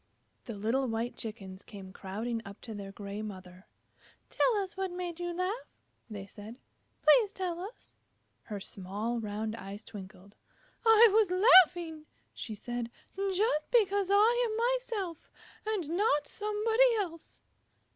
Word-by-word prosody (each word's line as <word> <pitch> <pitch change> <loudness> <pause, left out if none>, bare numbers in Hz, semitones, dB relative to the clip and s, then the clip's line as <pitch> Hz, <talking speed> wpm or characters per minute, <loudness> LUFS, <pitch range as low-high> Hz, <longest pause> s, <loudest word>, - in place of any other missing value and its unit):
The 230 - -6
little 230 +6 0
white 230 +1 -2
Chickens 195 -4 -7
came 195 -4 -11
crowding 220 +5 -4
up 200 0 -10
to 225 - -7
their 200 -2 -7
gray 200 +1 -6
mother. 185 -3 -9 0.6
"Tell - - +3
us 390 -3 -2
what 385 0 -2
made 355 -1 -5
you 350 0 -2
laugh," 365 +7 -3 0.3
they 205 -3 -6
said. 210 +3 -10 0.5
"Please 445 -5 +6
tell 365 -4 -3
us." 400 +7 -9 0.5
Her 210 -2 -5
small 205 +5 -4
round 215 0 -3
eyes 200 -1 -8
twinkled. 200 -2 -11 0.5
"I 450 0 +8
was 430 -3 +4
laughing," 355 -5 +5 0.3
she 220 - -6
said, 240 +2 -4 0.3
"just 390 -4 0
because 405 -4 +3
I 460 +5 +4
am 465 +3 +1
myself 420 -10 -4 0.4
and 410 -8 -1
not 365 -7 +2
somebody 445 +3 +2
else." 335 -6 -5
315 Hz, 135 wpm, -31 LUFS, -, 0.6 s, I